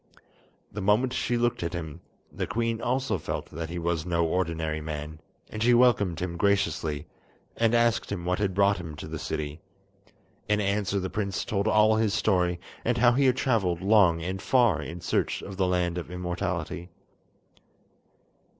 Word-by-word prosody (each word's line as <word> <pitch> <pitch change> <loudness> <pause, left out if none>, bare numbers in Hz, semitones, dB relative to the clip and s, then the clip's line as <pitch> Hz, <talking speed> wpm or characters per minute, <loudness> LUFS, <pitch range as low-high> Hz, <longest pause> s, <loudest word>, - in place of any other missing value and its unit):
The 105 - -5
moment 110 +6 +2
she 120 - 0
looked 120 0 0
at 85 0 -3
him, 85 -1 -6 0.3
the - - -3
queen 115 +2 -1
also 130 -1 0
felt - - -5
that 80 +1 -5
he 90 - -5
was 85 -1 -1
no 85 -1 +1
ordinary 80 -2 -1
man, 75 0 -6 0.3
and 110 - -5
she 120 +1 +5
welcomed 100 -9 +3
him 85 -1 -3
graciously, 90 -6 0 0.5
and 115 0 +2
asked 115 -2 +2
him 90 -4 -4
what 90 +1 0
had 100 -3 0
brought 100 0 +3
him 80 -4 -7
to 75 - -8
the 80 0 -5
city. 75 +1 -4 0.9
In 105 0 +3
answer 100 -1 0
the 95 0 -4
prince 100 -2 -2
told 100 0 -1
all 110 0 +4
his 110 -2 +1
story, 90 -4 +1 0.2
and 120 +1 +1
how 120 0 +5
he 135 +3 +2
had 130 0 +3
travelled 95 -11 +1
long 95 -5 +4
and 95 +3 -3
far 120 -4 +3
in 85 +1 -7
search - - -1
of 95 -1 -8
the 95 -1 +2
Land 90 -1 0
of 85 - -8
Immortality. 90 0 -4
95 Hz, 175 wpm, -27 LUFS, 85-110 Hz, 0.9 s, she